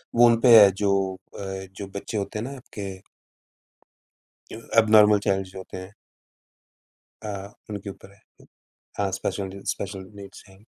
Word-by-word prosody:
वो 120 +1 +7
उनपे 115 0 +7
है 100 -1 +8
जो 100 -1 +2 0.5
अ, 95 -1 -5
जो 100 0 -7
बच्चे 105 +2 -4
होते 100 +1 -3
हैं - - -3
ना 140 +2 -7
आपके। 100 -6 -8 1.5
एब्नॉर्मल 110 -2 +4
चाइल्ड्स 95 -1 0
जो - - -11
होते 95 - -9
हैं। 95 +2 -9 1.3
अ, 105 - -5 0.4
उनके 100 -1 -6
ऊपर 100 0 -12
है। 100 - -24 0.5
हाँ, 100 -1 0
स्पेशल 95 0 -4
स्पेशल 95 -1 -7
नीड्स 100 -1 -11
हैं। 95 +2 -19
100 Hz, 140 wpm, -25 LUFS, 95-105 Hz, 1.5 s, है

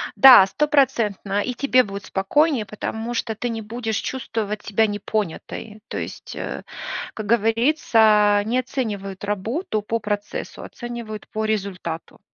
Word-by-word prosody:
Да, 255 -8 +10
стопроцентно 230 -6 +1
и 250 - -2
тебе 255 -1 +3
будет 200 -1 -7
спокойнее, 240 - +1
потому 220 +3 -4
что 225 -2 -2
ты 245 +3 -3
не 225 -1 -3
будешь 225 0 -3
чувствовать 215 -5 -3
себя 220 +2 +2
непонятой. 210 +1 -4
То - - -5
есть, - - -6
а, - - -5 0.5
как 215 - -6
говорится, 220 -2 +4
не 245 +3 +1
оценивают 205 -7 -4
работу 215 - -2
по 225 +2 -2
процессу, 205 -1 -4
оценивают 235 -3 -7
по 220 0 -2
результату. 190 -6 -4
220 Hz, 130 wpm, -22 LUFS, 205-240 Hz, 0.5 s, Да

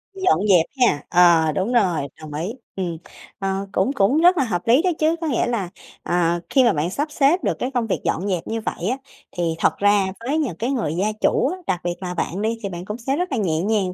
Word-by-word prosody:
Dọn 375 - +2
dẹp 175 -4 +5 0.2
ha, 150 - +3
ờ, 170 -3 +5
đúng 190 +10 -1
rồi, 185 -10 +2 0.2
đồng 150 -1 -9
ý, 165 +7 -3 0.2
ừ. 190 - -2 0.6
Ờ, 195 0 -2
cũng 265 - +1
cũng 240 +3 +2
rất 355 0 +5
là 275 - +3
hợp 180 -8 -2
lý 245 +6 +5
đó 365 - +1
chứ, 315 +1 +2
có 325 - -1
nghĩa 265 -6 +1
là, 210 -7 -2 0.3
ờ, 175 -1 +1
khi 265 - +4
mà 235 - +4
bạn 155 +3 -1
sắp 290 +11 -2
xếp 300 +6 +2
được - - -1
cái 255 - -2
công 240 -3 -1
việc - - -1
dọn 195 +5 -1
dẹp 180 -4 -2
như 225 0 -3
vậy 185 - -3
á, 255 - -1 0.4
thì 165 -2 0
thật - - +2
ra 205 -1 +3
với 265 +7 -1
những 270 - -1
cái 240 +7 -1
người 225 - -1
gia 205 +4 0
chủ - - +2
á, - - -7
đặc 180 - 0
biệt 175 0 -2
là 180 -1 -4
bạn 180 +2 -3
đi, 225 +2 -1
thì 200 - -2
bạn 175 0 -7
cũng 210 +3 -5
sẽ 265 +3 -2
rất 360 0 -2
là 260 - 0
nhẹ 165 -6 0
nhàng 200 -3 0
205 Hz, 255 wpm, -22 LUFS, 175-250 Hz, 0.6 s, dẹp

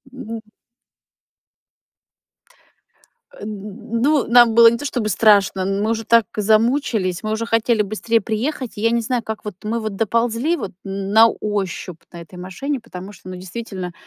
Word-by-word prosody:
М. 230 -3 -7 3.0
Н 215 +2 -6
ну, 290 +1 +2
нам 240 -1 +6
было 235 0 +9
не 235 - -2
то 245 - -8
чтобы 245 -6 -2
страшно, 200 -1 +3
мы 200 +3 0
уже 225 0 -2
так 230 -2 +4
замучились, 215 -3 +1
мы 215 - -2
уже 220 +1 -2
хотели 225 -1 +2
быстрее 215 +3 0
приехать. 235 +5 -3
Я 220 +2 +1
не 235 - +2
знаю, 240 0 -2
как 220 0 -6
вот 210 -4 -5
мы 225 +2 -2
вот 215 -2 -4
доползли 230 - 0
вот, 195 - -5
н 195 0 -4
на 225 +1 +8
ощупь, 195 -6 -4
на 170 - -9
этой 175 +2 -13
машине, 255 +10 -4
потому 195 -3 -9
что, 185 - -12
ну, 185 - -6
действительно, 185 -1 -7
220 Hz, 160 wpm, -20 LUFS, 195-235 Hz, 3.0 s, было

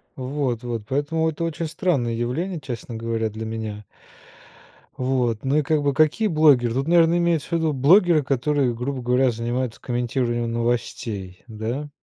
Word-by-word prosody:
Вот 130 -2 -2
вот 120 -3 -4
поэтому 155 +4 0
это 160 +2 -6
очень 165 0 -3
странное 155 -7 0
явление, 150 +10 -2
честно 120 -3 -7
говоря, 115 -1 -2
для 110 +1 -6
меня. 110 -2 -5 1.1
Вот. 125 -4 0
Ну 135 +3 +1
и 155 - +3
как 150 0 +1
бы 140 -1 +1
какие 155 +9 +3
блогеры? 140 -8 +4
Тут, 135 +2 -1
наверное, 170 0 +4
имеется 170 -3 +1
в - - -18
виду 160 -2 +1
блогеры, 160 +4 +5
которые, 135 -1 0
грубо 130 +3 -3
говоря, 125 +1 +3
занимаются 120 +1 -3
комментированием 120 -1 -1
новостей, 115 -5 -3
да. 120 +6 -4
130 Hz, 155 wpm, -23 LUFS, 115-155 Hz, 1.1 s, блогеры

